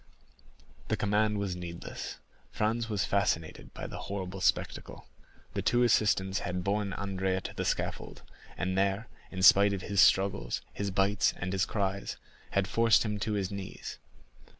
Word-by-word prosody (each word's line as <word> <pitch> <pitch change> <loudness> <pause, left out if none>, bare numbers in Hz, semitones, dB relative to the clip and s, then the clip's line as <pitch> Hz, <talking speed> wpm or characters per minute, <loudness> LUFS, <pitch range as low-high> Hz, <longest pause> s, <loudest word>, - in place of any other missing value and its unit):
20172m - - -29
The - - +1
recommendation 105 +1 +1
was 100 -3 -2
needless. 85 -1 -7 0.3
Franz 115 +2 0
was 105 -3 0
fascinated 100 -6 -1
by - - -6
the - - -6
horrible 95 -1 -4
spectacle. - - -1 0.5
The - - -1
two 120 +1 +3
assistants 100 -4 +2
had 90 0 -3
borne 100 0 0
Andrea 95 -1 -1
to - - -6
the - - -3
scaffold, - - -3 0.3
and 95 +1 -1
there, 100 +3 0 0.2
in 95 -1 -4
spite 100 +2 +7
of 95 -2 -4
his 100 -2 +2
struggles, 95 -11 +3
his 100 -1 -2
bites, 100 +2 +2
and 90 +1 -3
his 95 -1 +2
cries, 100 -2 -2 0.3
had 100 -1 +1
forced 115 0 +4
him 105 -1 -2
to 105 +1 -1
his 100 -2 -1
knees. 100 -1 -7
100 Hz, 160 wpm, -30 LUFS, 95-105 Hz, 0.5 s, spite